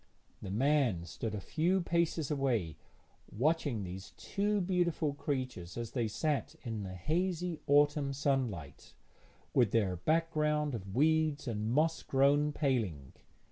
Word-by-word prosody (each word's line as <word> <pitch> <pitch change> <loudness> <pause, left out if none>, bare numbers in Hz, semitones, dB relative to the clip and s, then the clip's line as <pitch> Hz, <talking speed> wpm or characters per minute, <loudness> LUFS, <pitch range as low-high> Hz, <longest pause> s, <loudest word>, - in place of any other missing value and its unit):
The - - -6
man 120 - +2
stood 105 +5 -4
a - - -3
few 170 - +1
paces 170 -3 0
away, 120 - 0 0.6
watching 140 -2 0
these 95 +1 -8
two 205 +1 0
beautiful 175 -5 0
creatures 130 - -4
as 115 -1 -4
they 120 -4 0
sat 140 +4 -1
in 115 -3 -4
the 95 -2 -6
hazy 175 - -1
autumn 145 0 +4
sunlight, 130 - -2 0.6
with 120 -5 +4
their 95 -5 +1
background 150 - +1
of 100 -4 -6
weeds 155 0 +2
and 110 -1 -2
moss 160 +5 +2
grown 145 +2 +3
paling. 115 - -1
140 Hz, 130 wpm, -33 LUFS, 105-155 Hz, 0.6 s, autumn